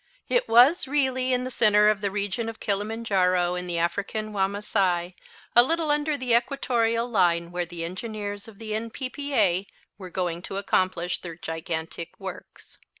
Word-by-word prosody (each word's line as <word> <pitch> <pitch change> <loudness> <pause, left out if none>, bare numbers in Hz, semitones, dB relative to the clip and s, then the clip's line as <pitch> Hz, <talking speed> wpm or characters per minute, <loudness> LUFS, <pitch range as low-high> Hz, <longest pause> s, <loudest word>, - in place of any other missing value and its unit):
It - - +1
was 255 +9 +6
really 260 -2 +1
in 250 0 +1
the 255 - -4
center 210 -3 +5
of 210 -1 +2
the 200 - 0
region 205 +3 -2
of 225 - -9
Kilimanjaro 195 -4 +1
in 180 0 -4
the 175 -1 -2
African 200 +5 -2
Wamasai, 190 -3 0 0.4
a 240 - +10
little 320 +3 +1
under 295 0 +1
the 250 -3 0
equatorial 235 -2 +1
line, 175 -6 +2
where 175 -1 -2
the 170 0 -6
engineers 205 +3 -5
of 220 -3 -13
the 215 -1 -5
N.P.P.A. 230 -4 -1 0.3
were 185 -2 -8
going 175 -2 -2
to 195 - -6
accomplish 185 -3 0
their 170 -2 -7
gigantic 165 -1 -5
works. - - -10
205 Hz, 155 wpm, -26 LUFS, 180-235 Hz, 0.4 s, a